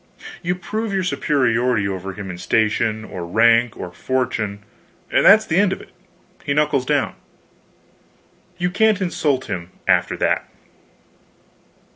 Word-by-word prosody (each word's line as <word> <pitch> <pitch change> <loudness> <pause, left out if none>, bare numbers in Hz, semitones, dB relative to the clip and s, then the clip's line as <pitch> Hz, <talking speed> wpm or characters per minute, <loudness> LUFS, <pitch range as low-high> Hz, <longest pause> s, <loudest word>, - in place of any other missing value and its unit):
You 180 0 -1
prove 215 +5 -4
your 190 - 0
superiority 125 - +1
over 95 0 -4
him 95 -1 -7
in 90 - -9
station, 110 +1 0
or 90 -4 -7
rank, 115 +5 +3
or 90 - -6
fortune, 110 -3 -2 0.5
and - - +3
that's 215 +2 +7
the 160 - 0
end 205 -2 +3
of 190 - -3
it - - -15 0.5
he 140 -1 -1
knuckles 150 -4 +1
down. - - +1 1.4
You 180 0 -1
can't 215 +1 +3
insult 150 -8 0
him 90 -4 -5 0.2
after - - +2
that. - - 0
125 Hz, 135 wpm, -20 LUFS, 105-175 Hz, 1.4 s, that's